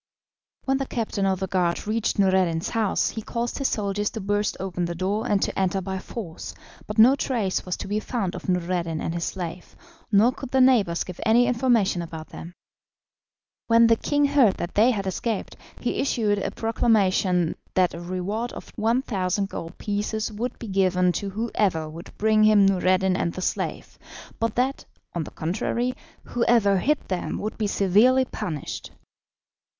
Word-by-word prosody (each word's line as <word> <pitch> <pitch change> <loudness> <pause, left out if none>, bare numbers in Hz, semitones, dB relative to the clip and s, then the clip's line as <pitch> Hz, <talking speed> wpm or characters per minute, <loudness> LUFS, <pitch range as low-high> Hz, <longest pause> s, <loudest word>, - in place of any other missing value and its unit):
When 270 0 +2
the 270 - -2
captain 210 -4 -1
of 190 -1 0
the 190 - -1
guard 180 -3 0
reached 220 +2 -1
Noureddin's 185 -4 +2
house 220 -4 +1
he 220 - -5
caused 235 +4 -3
his 275 - +1
soldiers 205 -1 -1
to 225 - -6
burst 205 +1 -1
open 180 -2 -2
the 170 0 -4
door 195 +5 -1
and 205 - +3
to - - -2
enter 190 0 +1
by 190 0 -4
force, 185 -4 -7 0.3
but 210 - -6
no 240 +5 +7
trace 225 -10 -1
was 180 - -2
to - - -6
be 205 +2 0
found 215 -5 -3
of - - -7
Noureddin 175 -2 -1
and 165 - -3
his 170 -1 -2
slave, 175 -2 -6 0.4
nor 215 +4 +5
could 265 0 -8
the 265 - +2
neighbours 230 -10 +4
give 180 -2 -9
any 235 +2 +4
information 235 -7 +2
about 160 -1 -8
them. 170 +2 -10 1.1
When 230 0 +6
the 230 0 +5
king 290 +5 +1
heard 275 -8 +4
that 175 - -5
they 220 +4 +5
had 205 -6 -1
escaped, 205 +3 -3 0.2
he - - -2
issued 215 -7 +1
a - - -2
proclamation 195 -6 +1 0.2
that 185 -1 +3
a 170 - -7
reward 185 +7 -3
of - - -10
1,000 210 -4 0
gold 165 -2 -7
pieces 210 +2 -2
would 230 +4 -4
be 230 - -8
given 185 -2 +2
to 200 +3 -3
whoever 200 -6 -1
would 165 +3 -10
bring 215 0 +3
him 215 -2 +6
Noureddin 185 0 +2
and 170 -2 -1
the 185 - -6
slave, - - -3 0.4
but 230 -1 -1
that, 260 +3 0 0.3
on 170 -3 -2
the - - -8
contrary, 230 +9 -2 0.3
whoever 230 -5 +2
hid 300 +8 0
them 185 -2 -2
would 215 - -4
be 215 - +1
severely 215 +7 +4
punished. 175 - -5
200 Hz, 175 wpm, -24 LUFS, 185-230 Hz, 1.1 s, no